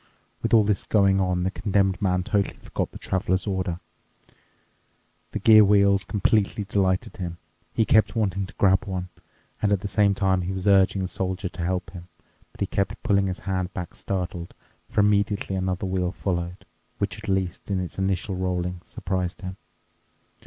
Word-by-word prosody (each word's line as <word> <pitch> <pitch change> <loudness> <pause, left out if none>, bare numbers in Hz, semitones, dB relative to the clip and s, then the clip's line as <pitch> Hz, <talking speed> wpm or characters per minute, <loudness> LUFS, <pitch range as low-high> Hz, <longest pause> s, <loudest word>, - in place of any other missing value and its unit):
With - - -1
all 110 -2 +6
this 105 -1 0
going 100 -2 +3
on, 90 -1 0
the 95 - 0
Condemned 100 -1 +1
Man 90 -2 +1
totally 105 -2 0
forgot - - -4
the - - -9
Traveler's 95 0 -1
order. 95 -4 -2 1.5
The - - -4
gear 110 -1 +7
wheels 100 -1 +4
completely 105 +1 +1
delighted 95 -2 0
him. 85 -2 -5 0.3
He 110 - +1
kept 110 +2 +3
wanting 100 -3 0
to - - -13
grab 95 -1 +3
one, 90 -2 -4 0.5
and 105 - +2
at 100 -3 +2
the 100 - -3
same 100 -1 +3
time 95 -2 +2
he 90 +2 -3
was 95 0 -4
urging 95 -1 +4
the - - -1
Soldier 95 +1 -3
to 90 - -8
help 90 +1 -2
him. 90 -2 -10 0.4
But - - -18
he - - +3
kept 100 +2 -2
pulling 100 -1 +2
his 95 0 -4
hand 95 -1 -2
back 90 -2 -5
startled, 90 -2 -4 0.3
for - - +2
immediately 100 -1 +1
another 95 +1 -1
wheel 90 -1 0
followed, 90 -2 -3 0.3
which, 100 -1 -2
at 105 -1 -7
least 95 -1 -1
in 95 -2 0
its 90 +1 -5
initial 95 0 -1
rolling, 90 -1 -2
surprised 90 -2 -3
him. 95 -1 -6
95 Hz, 175 wpm, -25 LUFS, 90-100 Hz, 1.5 s, gear